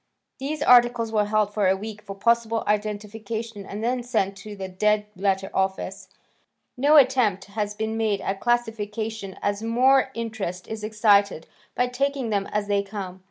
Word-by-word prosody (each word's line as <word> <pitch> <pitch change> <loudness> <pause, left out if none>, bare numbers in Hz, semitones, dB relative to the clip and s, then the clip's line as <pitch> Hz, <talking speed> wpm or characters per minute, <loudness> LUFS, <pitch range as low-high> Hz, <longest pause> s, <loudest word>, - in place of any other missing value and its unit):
These 295 +3 -3
articles 240 -3 +5
were 210 -2 +2
held 210 -1 +1
for 205 -3 +2
a 190 - +4
week 210 +1 -7
for 200 -2 -8
possible 230 +2 +1
identification 210 +1 -3
and 210 +2 -6
then 245 +1 0
sent 220 -5 -1
to 210 +1 -9
the 190 -1 -5
Dead 210 +3 +1
Letter 195 0 0
Office. 190 0 -2 0.7
No 290 +4 +5
attempt 235 -8 +4
has 210 0 -3
been 220 +1 -2
made 215 -3 +1
at 195 0 -3
classification 220 -3 -2
as 205 +1 0
more 255 +4 +3
interest 215 -6 -4
is 220 -1 -6
excited 205 -5 +3 0.3
by 250 - +2
taking 265 -1 -1
them 200 -1 0
as 210 -1 -2
they 205 -1 +1
come. 195 -2 -7
215 Hz, 160 wpm, -24 LUFS, 200-230 Hz, 0.7 s, articles